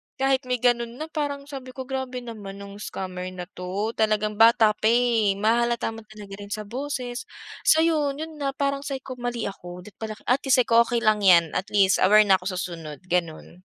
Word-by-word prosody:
Kahit 270 -1 +1
may 250 - +1
ganun 240 -1 +1
na 310 +4 -7
parang 285 -2 -3
sabi 265 -3 -9
ko, 260 - -5
"Grabe 260 -1 -4
naman 210 -4 -8
nung 200 0 -10
scammer 185 -3 -5
na 180 - -5
'to," 195 +5 -3
talagang 215 -1 +1
bata 225 -1 +6
pa 215 +1 -1
eh. 230 -4 +3
Mahahalata 235 +2 +1
mo 225 -1 -11
talaga 210 -2 -11
rin 205 - -8
sa 215 - -4
boses. 250 +1 -5 0.4
So, 320 +1 +6
yun, 300 -4 +1
yun 315 0 -7
na 275 -1 -2
parang 275 0 0
sabi 270 -1 -4
ko, 255 -2 -8
"Mali 240 -1 -3
ako." 180 -2 -7
Dapat 210 - -15
pala 220 -1 -5
atleast 260 +1 +2
sabi - - -31
ko, 235 0 +6
"okey 235 -1 -1
lang 215 -1 +3
yan," 170 -5 +5
atleast 195 0 +2
aware 210 +3 +6
na 195 -2 +4
ako 180 - -7
sa - - -3
sunod, 165 -3 -7
gano'n. 175 +1 -3
225 Hz, 205 wpm, -25 LUFS, 200-260 Hz, 0.4 s, bata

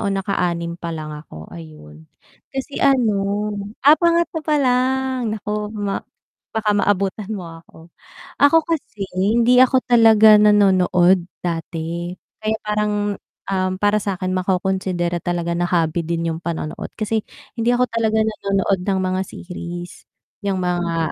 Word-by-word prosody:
o 205 - -1
nakaanim 175 -3 -2
pa 170 - -5
lang 155 -1 -6
ako, 150 - -10
ayun. 75 -1 -12 0.4
Kasi 270 +1 -5
ano, 260 -6 +3 0.7
ah, 300 +2 +8
pangatlo 340 -1 +2
palang, 260 -4 +1
naku 210 0 -3
ma 200 -1 -2 0.5
baka 215 -1 +1
maabutan 200 0 0
mo 185 - -7 0.2
ako. 165 0 -18 0.5
Ako 285 +3 +7
kasi 250 -11 -3
hindi 230 +6 +3
ako 260 0 +3
talaga 220 -3 +7
nanonood 190 -3 +4 0.2
dati, 170 0 -4 0.3
kaya 215 0 +1
parang, 210 0 0 0.6
um, 185 -1 0
para 205 +2 +2
sa'kin 185 -2 -3
makokonsidera 185 -1 -1
talaga 170 0 -2
na 175 0 0
hobby 170 -1 +1
din 165 0 -1
yung 160 - -5
panonood 165 -2 -5
kasi 220 +1 -1 0.4
hindi 240 +2 +2
ako 250 - +2
talaga 225 -1 0
nanonood 195 -3 0
ng 195 -1 +1
mga 185 0 -1
series, 175 -1 -8 0.3
yung 195 -3 -2
mga, 170 -3 -1
195 Hz, 130 wpm, -20 LUFS, 175-220 Hz, 0.7 s, ah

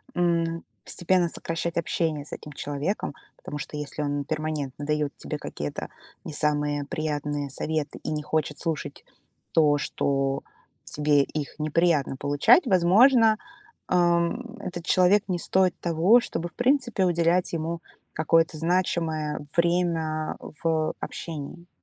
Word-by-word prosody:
м, 170 -1 +1 0.2
постепенно 180 0 +1
сокращать 170 +1 -3
общение 160 -3 -1
с - - -10
этим 150 - -8
человеком. 145 +7 -3 0.2
Потому 145 - -7
что, - - -6
если 150 0 -5
он 145 -1 -1
перманентно 150 -2 -3
дает 150 -1 -1
тебе - - -5
какие-то 75 0 -5 0.3
не - - -6
самые 145 -1 0
приятные 145 -3 -2
советы 150 +2 -3
и - - -3
не 150 -1 -2
хочет 150 -1 -1
слушать 165 -3 -4 0.5
то, 150 -2 +4
что 135 -1 -1 0.4
тебе 145 -1 +2
их 150 +1 -5
неприятно 155 -2 +2
получать, 145 - +4
возможно, 215 +5 +5 0.5
ам, 175 +7 +1
этот 175 -2 -6
человек 185 +3 +4
не 180 -2 -1
стоит 185 +1 +2
того, 175 +8 +5
чтобы, 175 -6 -4
в - - -30
принципе, 245 -6 +2
уделять 170 +1 +2
ему 165 +1 -2 0.3
какое-то 160 +1 +2
значимое 160 -3 0
время 170 -3 +1 0.3
в 160 -1 +1
общении. 165 +2 -6
160 Hz, 125 wpm, -26 LUFS, 150-175 Hz, 0.5 s, возможно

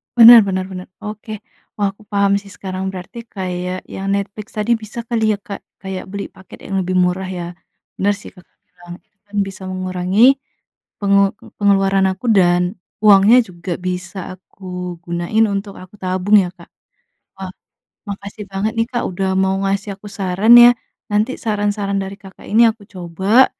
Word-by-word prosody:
Bener 235 0 +11
bener 185 -1 -1
bener, 185 -1 -7 0.2
oke. 215 +1 -7 0.5
Wah, 200 -2 +1
aku 205 +2 -21
paham 200 -1 +2
sih 200 - -15
sekarang, 190 -1 -6
berarti 190 +5 -9 0.2
kayak 180 -1 -4
yang 195 +1 -6
Netflix 200 +1 -5
tadi 210 +2 0
bisa 220 +1 -5
kali 225 -2 +1
ya - - -11
Kak 200 0 -8 0.2
kayak 190 -1 -5
beli 200 +1 -5
paket 190 - -14
yang 195 - -4
lebih 185 0 -2
murah 180 +1 +1
ya, 180 -2 -4 0.5
bener 205 +1 +2
sih - - -11
Kakak 180 -1 -21
bilang, 175 -1 -13
itu 200 - -49
kan 205 - -12
bisa 195 0 -9
mengurangi, 185 +1 -1 0.8
pengel 200 0 +3 0.3
pengeluaran 195 -1 +3
aku 190 +6 -9
dan 180 -3 +4 0.4
uangnya 210 +3 +7
juga 175 -1 -6
bisa 185 +1 -4 0.2
aku 180 -1 -8
gunain 175 +6 +1
untuk 200 0 -4
aku 185 +2 -14
tabung 185 +3 +3
ya 180 - -2
Kak, 170 -2 -16 0.7
wah 190 -1 -6 0.6
makasih 200 +1 -7
banget 195 +3 -1
nih 225 +1 +1
Kak 240 - -1
udah 190 +1 -2
mau 190 0 +2
ngasih 200 +1 -1
aku 205 - -12
saran 200 +3 +3
ya, 240 - +9 0.4
nanti 215 +5 0
saran-saran 205 -2 -1
dari 195 +1 -7
Kakak 195 -1 -14
ini 230 +3 +5
aku 220 -2 -17
coba, 190 +7 +3
195 Hz, 165 wpm, -18 LUFS, 185-210 Hz, 0.8 s, Bener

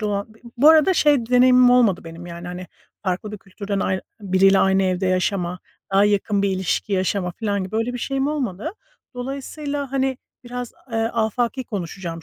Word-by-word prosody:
olan 205 0 -3
b 220 - -21 0.2
bu 285 +5 +6
arada 320 +4 +6
şey 290 -7 +3
deneyimim 250 0 +6
olmadı 235 -7 +4
benim, 165 +1 -9
yani, 170 0 -8
hani, 180 +1 -7 0.4
farklı 190 +2 -3
bir 210 - -6
kültürden 200 0 -5
ay 190 0 0 0.2
biriyle 195 0 +4
aynı 190 0 +3
evde 185 0 0
yaşama, 180 -1 0 0.3
daha 195 +1 +5
yakın 205 0 +1
bir 200 - +2
ilişki 190 +2 -1
yaşama 185 -1 0
filan 200 -1 -2
gibi. 195 +4 -5
Öyle 225 +2 -1
bir 245 - -5
şeyim 270 +2 -1
olmadı. 280 - -2 0.4
Dolayısıyla, 280 +2 -5
hani, 265 -1 0 0.3
biraz, 245 0 -6 0.2
eee, - - -1
afaki 230 +3 -1
konuşacağım 175 -5 -5
205 Hz, 170 wpm, -22 LUFS, 190-250 Hz, 0.4 s, bu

